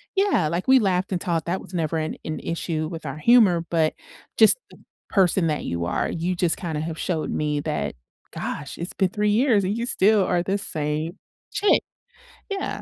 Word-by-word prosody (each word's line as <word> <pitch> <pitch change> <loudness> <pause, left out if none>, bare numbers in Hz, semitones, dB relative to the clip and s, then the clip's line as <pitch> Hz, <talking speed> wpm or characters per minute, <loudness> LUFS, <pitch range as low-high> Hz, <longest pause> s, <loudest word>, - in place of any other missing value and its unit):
yeah, 385 - +2
like, 170 +4 -2
we 265 0 +7
laughed 190 -3 0
and 180 - 0
talked, 170 -2 -1
that 185 +2 -1
was - - -13
never 165 -1 -1
an 155 0 -2
an 155 - -4
issue 160 -2 -2
with 165 -2 -7
our 135 - -5
humor, 190 -3 +5
but 160 -2 +2 0.4
just - - +7
the - - -16 0.3
person 185 -3 +3
that 150 - -2
you 85 0 -2
are, 90 - -1
you 175 +2 -2
just 175 -2 +1
kinda 160 -4 -3
have 160 0 -5
showed 165 -4 -2
me 150 -1 -1
that, 70 - -3 0.4
"Gosh, 140 0 -5
it's 170 +2 -5
been 190 -2 +1
three 210 +1 0
years, 225 -2 +3
and 190 +3 -1
you 235 +1 -2
still 205 -1 +4
are 175 -1 +1
the 195 +3 0
same 155 +1 -3 0.3
chick." 415 0 +3 0.7
Yeah. 390 -1 -3
175 Hz, 195 wpm, -24 LUFS, 155-200 Hz, 0.7 s, we